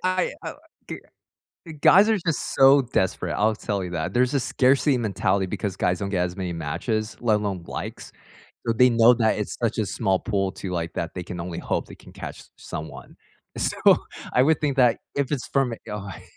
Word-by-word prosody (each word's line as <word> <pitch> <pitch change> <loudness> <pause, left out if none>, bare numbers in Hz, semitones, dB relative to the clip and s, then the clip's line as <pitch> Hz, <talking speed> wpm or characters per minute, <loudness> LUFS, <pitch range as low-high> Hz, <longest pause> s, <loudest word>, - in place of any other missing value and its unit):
Y 185 0 0
I, - - -4
uh - - -5
Oh, - - -18 0.3
g - - -5 0.7
Uh, 160 - -7
guys 205 +3 +7
are 220 - +3
just 165 -4 -3
so 135 +1 +7
desperate, 105 -6 -1
I'll 110 +1 +2
tell 100 -3 -3
you 90 - -6
that, 80 -2 -3
there's 125 +2 +2
a 140 - +2
scarcity 130 +2 +2
mentality, 100 -3 0
because 95 0 -4
guys 90 -2 0
don't 100 -1 -3
get 90 -3 0
as 90 +1 -6
many 90 -2 -3
matches, 110 - -3
let 110 -3 +3
alone 100 -4 -3
likes. - - -7 0.6
So 115 - +2
they 125 +2 +5
know 115 +1 +6
that 110 -2 +2
it's 105 - -4
such 115 -1 0
a 110 - +1
small 95 -2 0
pool 100 -4 -1
too, 95 -1 -7
like, 85 -2 -3
that 85 - -3
they 90 - -4
can 90 0 -7
only 85 0 -5
hope - - -2
they - - -11
can - - -16
catch - - -8
someone. 80 +1 -8 0.4
So, - - -1 0.6
I 125 - +4
would 160 +3 +3
think 145 -3 0
that 125 -3 +4 0.2
if 140 0 -1
it's 135 -4 -2
from 135 -3 +1
a - - -7
guy 100 -3 -7
110 Hz, 215 wpm, -24 LUFS, 95-125 Hz, 0.7 s, guys